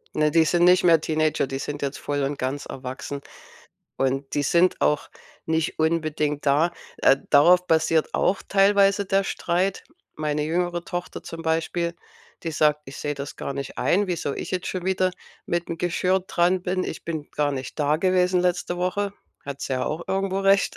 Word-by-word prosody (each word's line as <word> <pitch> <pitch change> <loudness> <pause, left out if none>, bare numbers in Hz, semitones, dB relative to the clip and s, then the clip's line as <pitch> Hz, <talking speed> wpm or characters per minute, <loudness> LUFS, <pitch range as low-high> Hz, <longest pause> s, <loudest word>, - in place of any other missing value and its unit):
Ne, 150 0 +2
die 165 0 +4
sind 175 +2 +2
nicht 180 +1 +6
mehr 165 -3 +5
Teenager, 155 -3 0
die 135 0 -4
sind 145 +1 -5
jetzt 140 0 -2
voll 145 -1 -2
und 140 +1 -2
ganz 135 +3 -3
erwachsen 135 +2 -6 0.8
und 135 +1 -1
die 145 - +1
sind 170 +5 +3
auch 150 -1 +1 0.4
nicht 160 0 -1
unbedingt 155 -2 0
da. 150 +5 +3 0.3
Äh, 135 - +5
darauf 180 +5 +6
basiert 160 -1 +2
auch 195 - +1
teilweise 200 0 +4
der 195 +1 +2
Streit. 185 +1 -1 0.3
Meine 150 -1 -1
jüngere 175 +2 -1
Tochter 175 -1 -5
zum 165 0 -8
Beispiel, 165 +1 -1 0.5
die 165 - -3
sagt:„ 150 -1 +2
Ich 135 - -9
sehe 145 0 -2
das 140 +2 -7
gar - - -4
nicht 140 -1 -6
ein, 200 +3 +2
wieso 165 -5 -2
ich - - -6
jetzt 185 -1 -2
schon 185 -2 -4
wieder, 185 -1 +1 0.3
mit 170 0 -2
dem 170 - -4
Geschirr 180 +2 +1
dran 180 0 +1
bin. 185 0 -1
Ich - - -6
bin 160 -3 -5
gar 145 -1 0
nicht 130 -2 -6
da 150 0 +2
gewesen 180 +1 +2
letzte 175 0 0
Woche." 195 +3 -1 0.3
Hat 140 0 -6
sie - - -3
ja 130 -1 0
auch 155 +3 -3
irgendwo 195 0 -1
recht. 195 0 +3
165 Hz, 185 wpm, -24 LUFS, 145-180 Hz, 0.8 s, nicht